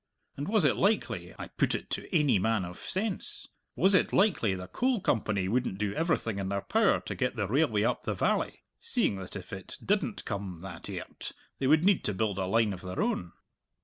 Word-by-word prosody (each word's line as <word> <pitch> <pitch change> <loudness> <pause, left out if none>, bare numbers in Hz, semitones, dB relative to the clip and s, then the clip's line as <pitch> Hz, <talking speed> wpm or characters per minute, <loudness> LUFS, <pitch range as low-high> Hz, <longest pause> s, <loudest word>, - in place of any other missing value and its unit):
And 145 +2 -4
was 210 -5 +3
it 145 - +3
likely 205 +3 0
I - - -7
put - - +1
it - - -6
to - - -3
ainy 150 - +4
man 110 -3 +1
of 90 0 -9
sense 225 - -3 0.3
was 195 +1 +4
it 185 - +4
likely 170 - +3
the 90 0 -6
Coal 250 - +1
Company 105 - 0
wouldn't 120 -2 0
do 100 -1 -1
everything 135 - 0
in 95 -1 -2
their 100 0 -1
power 220 - +3
to - - -5
get 125 -2 -1
the 105 -3 0
railway 115 -3 +2
up - - +1
the - - -2
valley, - - 0 0.2
seeing 100 - +1
that 95 -1 -8
if - - -7
it - - -6
didn't - - 0
come 95 -4 -4
that 90 -3 -7
airt - - -6 0.3
they 135 - +1
would 155 +4 +5
need 200 -2 +4
to 105 - 0
build 100 -1 0
a 95 - -1
line 110 0 +3
of 90 - -8
their 90 0 -5
own?" 85 -2 -1
110 Hz, 215 wpm, -30 LUFS, -, 0.3 s, would